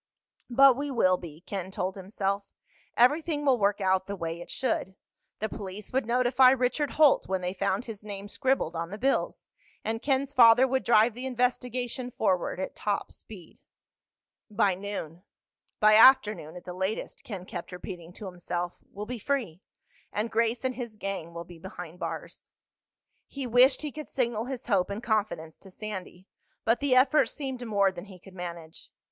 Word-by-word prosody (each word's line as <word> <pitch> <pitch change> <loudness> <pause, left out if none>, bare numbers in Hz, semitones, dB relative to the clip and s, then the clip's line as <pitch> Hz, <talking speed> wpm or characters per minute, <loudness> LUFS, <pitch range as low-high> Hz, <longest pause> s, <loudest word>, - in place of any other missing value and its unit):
But 270 +1 +7
we 285 +2 -3
will 185 -8 +3
be, 165 -3 -10
Ken 190 -1 -5
told 190 0 -2
himself. 195 +1 -2 0.5
Everything 295 +4 +3
will 260 -3 +4
work 205 0 +2
out 190 -1 +1
the 200 - -3
way 165 -2 -4
it - - -10
should. 190 -7 -2 0.4
The 220 - -2
police 205 0 -8
would 260 -3 0
notify 250 +1 +5
Richard 260 +3 +1
Holt 300 -3 +5
when 190 -1 -1
they 180 0 -2
found 195 +3 -1
his 215 -3 -8
name 200 -1 -7
scribbled 255 -7 0
on 165 0 -3
the 205 - -6
bills, 270 +5 0 0.4
and 225 +1 -2
Ken's 275 0 0
father 245 0 +7
would 265 0 0
drive 225 0 +4
the 250 +3 -5
investigation 250 0 -1
forward 190 -7 0
at 190 - -4
top 205 -1 -2
speed. 185 -7 -13 0.9
"By 205 -2 +2
noon—by 200 +2 -2
afternoon 215 - +6
at 180 - -9
the 180 - -6
latest," 190 +4 -3
Ken 195 -5 -7
kept 175 -1 -7
repeating 180 -1 -8
to 210 - -9
himself, 175 -1 -4
"we'll 205 +1 -6
be 245 +1 -5
free. 215 - -2 0.5
And 215 +2 -2
Grace 230 +2 0
and 260 - 0
his 240 -3 -6
gang 195 -5 -5
will 170 0 -7
be 170 -1 -13
behind 180 -1 -9
bars." - - -6 0.8
He 275 -2 -6
wished 250 +4 +4
he 300 - -3
could 305 +2 -8
signal 235 -3 -1
his 255 -1 -5
hope 195 -5 +1
and 205 +3 -5
confidence 200 -8 -1
to 195 - -14
Sandy, 190 -2 -7 0.4
but 230 +2 +3
the 280 -3 +2
effort 260 +4 +5
seemed 265 -4 -5
more 200 -3 +3
than 175 0 -9
he 195 -3 -12
could 185 +1 -16
manage. 170 -3 -8
210 Hz, 175 wpm, -28 LUFS, 185-250 Hz, 0.9 s, But